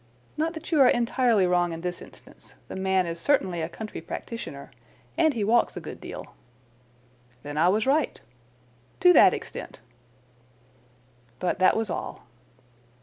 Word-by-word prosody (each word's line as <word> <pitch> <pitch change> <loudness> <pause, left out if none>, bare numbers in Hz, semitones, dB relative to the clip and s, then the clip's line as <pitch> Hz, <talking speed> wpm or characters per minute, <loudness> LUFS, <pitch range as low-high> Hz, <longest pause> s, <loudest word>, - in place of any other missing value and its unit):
Not 320 +2 -1
that 320 +2 -8
you 310 -4 +4
are 255 - +7
entirely 240 -4 +2
wrong 175 -1 +1
in 165 - -7
this 180 0 -4
instance. - - -16
The - - -6
man 190 -1 +1
is 170 0 -5
certainly 190 - +1
a 160 - -3
country 215 +4 -7
practitioner. 145 -12 -7 0.4
And 315 -5 +2
he 220 - -1
walks 230 +4 +2
a - - -2
good - - -9
deal." - - -9 1.1
"Then 145 0 -7
I 165 +4 +4
was 210 +3 +1
right." 285 +2 +1 0.8
"To 360 -1 +7
that - - +7
extent." - - -8 1.6
"But 180 +6 -2
that 185 +3 +4
was 220 -4 -1
all." - - -5
205 Hz, 150 wpm, -26 LUFS, 175-255 Hz, 1.6 s, are